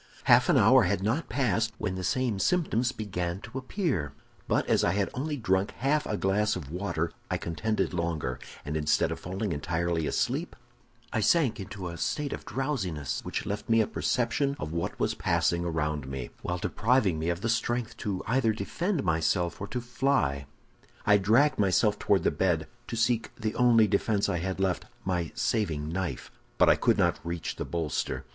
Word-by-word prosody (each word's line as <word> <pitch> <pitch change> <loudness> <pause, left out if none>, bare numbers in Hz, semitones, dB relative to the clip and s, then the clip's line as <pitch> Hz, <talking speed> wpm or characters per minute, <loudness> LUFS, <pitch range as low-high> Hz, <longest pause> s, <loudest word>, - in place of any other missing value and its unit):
"Half - - +5
an - - +5
hour - - +6
had 95 - 0
not 120 +11 0
passed 115 -2 +1
when 95 - -2
the 95 0 -4
same 120 -2 0
symptoms 130 - +1
began 90 -6 -3
to 120 +5 -6
appear; 130 - -2 0.3
but - - +1
as - - +2
I 85 - +2
had 100 0 0
only 145 +3 -2
drunk 95 -4 +1
half 145 +3 +1
a 105 - -1
glass 105 +3 +1
of 80 -7 -6
the - - -9
water, 85 -3 -2 0.2
I - - 0
contended 105 +6 -1
longer, 85 -7 -2 0.3
and 75 +1 -3
instead 75 -1 +2
of - - -4
falling 95 +3 -3
entirely 85 +1 -1
asleep, - - -1 0.6
I - - +1
sank 130 +2 +3
into 95 -1 -6
a 85 -1 -6
state 150 -2 -1
of - - -7
drowsiness 110 - -2
which - - -3
left 105 +2 -4
me 115 0 +5
a 110 - +4
perception 135 +6 0
of 75 - -5
what 85 0 -3
was - - +1
passing 85 0 +1
around 75 -4 -1
me, 65 -2 -5
while 90 - -2
depriving 105 -3 +1
me 80 +2 -1
of 85 +1 -2
the 115 - -1
strength 120 0 -1 0.2
either 115 -1 +2
to - - -10
defend 175 - -1
myself 85 +1 0
or 100 - -3
to 125 - -3
fly. 120 - 0 0.6
"I 105 0 +6
dragged 115 +9 +3
myself 105 +2 +3
toward 95 -4 +2
the - - +3
bed, 85 -4 +1 0.2
to - - -4
seek 115 0 +1
the 110 -2 -3
only 120 -3 +5
defense 105 0 +1
I 85 - 0
had 95 +2 -3
left—my 90 -1 -2
saving 85 -11 0
knife; 90 +1 -3 0.3
but - - +5
I - - +7
could - - +2
not - - +2
reach 85 0 -4
the - - -3
bolster. 80 -5 -2
100 Hz, 185 wpm, -28 LUFS, 85-120 Hz, 0.6 s, I